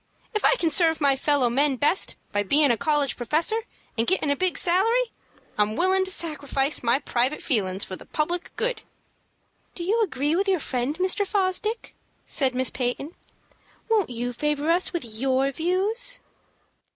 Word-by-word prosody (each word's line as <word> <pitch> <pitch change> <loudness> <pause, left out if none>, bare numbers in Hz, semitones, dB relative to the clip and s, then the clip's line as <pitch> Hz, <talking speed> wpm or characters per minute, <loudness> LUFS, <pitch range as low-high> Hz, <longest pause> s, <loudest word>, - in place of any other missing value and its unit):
If 425 - -1
I - - +5
can 335 -9 0
serve 320 +1 +4
my 280 -3 +3
fellow 280 -2 +2
men 275 +3 +2
best 290 +8 +1 0.2
by 205 - +1
bein' 280 +7 +3
a - - +3
college 290 +2 0
professor, 330 - -1 0.3
and 230 0 0
gettin' 355 -6 +1
a - - +2
big 370 +3 0
salary, 455 +7 +2 0.5
I'm 210 +1 +2
willin' 375 +4 +2
to - - -3
sacrifice 300 -5 0
my 235 +1 +3
private 265 0 -1
feelin's 195 -6 0
for 185 - -5
the - - -14
public 340 +3 -2
good." 485 -2 -1 0.9
"Do 345 - -5
you 430 +6 +1
agree 295 -6 0
with 390 +3 0
your 380 -3 +2
friend, 265 +2 -2
Mr. 375 +3 +2
Fosdick?" 405 +3 -1 0.3
said 260 -3 +1
Miss 260 0 0
Peyton. 260 +5 -3 0.8
"Won't 420 -8 +2
you 245 0 -4
favor 295 +4 0
us 355 +2 +2
with 345 -8 -3
your 260 +4 0
views?" 405 - -1
300 Hz, 165 wpm, -25 LUFS, 260-375 Hz, 0.9 s, I